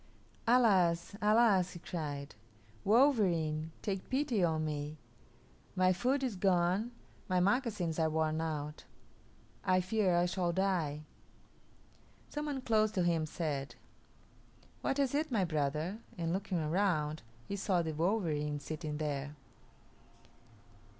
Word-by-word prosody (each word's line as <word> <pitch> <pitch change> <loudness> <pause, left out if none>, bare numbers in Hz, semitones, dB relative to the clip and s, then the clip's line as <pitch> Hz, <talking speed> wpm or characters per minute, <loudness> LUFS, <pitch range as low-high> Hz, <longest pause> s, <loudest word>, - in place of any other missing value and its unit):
"Alas, 195 -8 +4
alas!" 210 -4 +4
he 175 - -8
cried; 145 -5 -5 0.5
"wolverene, 185 - +3
take 195 -2 -3
pity 260 -7 +1
on 160 -2 +1
me. 150 0 -4 0.8
My 185 0 +4
food 260 +8 0
is 250 -6 -1
gone, 185 +3 +2 0.4
my 185 0 +3
moccasins 200 - +1
are 160 -1 +3
worn 155 0 0
out; 150 -2 -4 0.8
I 185 -1 +3
fear 185 -1 +1
I 175 - +3
shall 175 -1 0
die." 170 -6 0 1.3
Some 295 0 -3
one 280 -3 -3
close 215 -3 +3
to 185 - +1
him 165 -2 +1
said, 150 -4 -3 1.1
"What 270 - 0
is 275 -2 +1
it, 305 +1 0
my 205 -6 +2
brother?" 155 +5 -1 0.2
and 165 -1 -1
looking 190 -1 -2
around, 155 -2 0 0.3
he 200 - -3
saw 185 -3 +1
the 160 -1 -3
wolverene 155 -4 0
sitting 155 0 -5
there. 145 -1 -3
175 Hz, 125 wpm, -33 LUFS, 155-210 Hz, 1.3 s, Alas